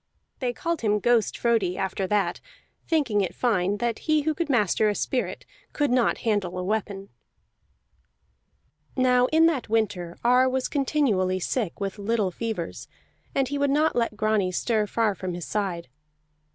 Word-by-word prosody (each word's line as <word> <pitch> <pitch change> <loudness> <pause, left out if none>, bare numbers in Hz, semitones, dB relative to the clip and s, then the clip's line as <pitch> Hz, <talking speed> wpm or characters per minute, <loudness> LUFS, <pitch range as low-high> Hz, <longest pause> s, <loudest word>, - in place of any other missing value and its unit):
They 250 -2 -1
called 335 +6 -3
him 210 -2 +2
Ghost 235 0 +2
Frodi 220 -7 +1
after 190 0 -2
that, 195 -3 0 0.5
thinking 270 -11 +1
it 185 - -3
fine 205 -5 +1
that 235 0 -2
he 310 -1 +3
who 315 +1 +1
could 325 0 -3
master 215 -4 +2
a 205 - -1
spirit 255 +4 -2 0.3
could 290 -4 0
not 250 -1 +2
handle 200 -5 0
a 180 - -2
weapon. 200 -1 -3 1.9
Now 250 -1 +4
in 320 +3 +4
that 300 -9 0
winter 200 -6 -1
Ar 250 +2 +4
was 260 0 -1
continually 245 -11 +1
sick 205 -1 -2
with 200 +1 -4
little 205 -2 0
fevers, 215 -4 -5 0.5
and 270 -2 +1
he 285 0 -2
would 285 0 +2
not 300 +3 +2
let 230 -3 0
Grani 215 -3 +1
stir 215 +2 0
far 220 -1 +1
from 185 -2 -5
his 175 - -6
side. 190 -6 -3
220 Hz, 160 wpm, -25 LUFS, 195-255 Hz, 1.9 s, Now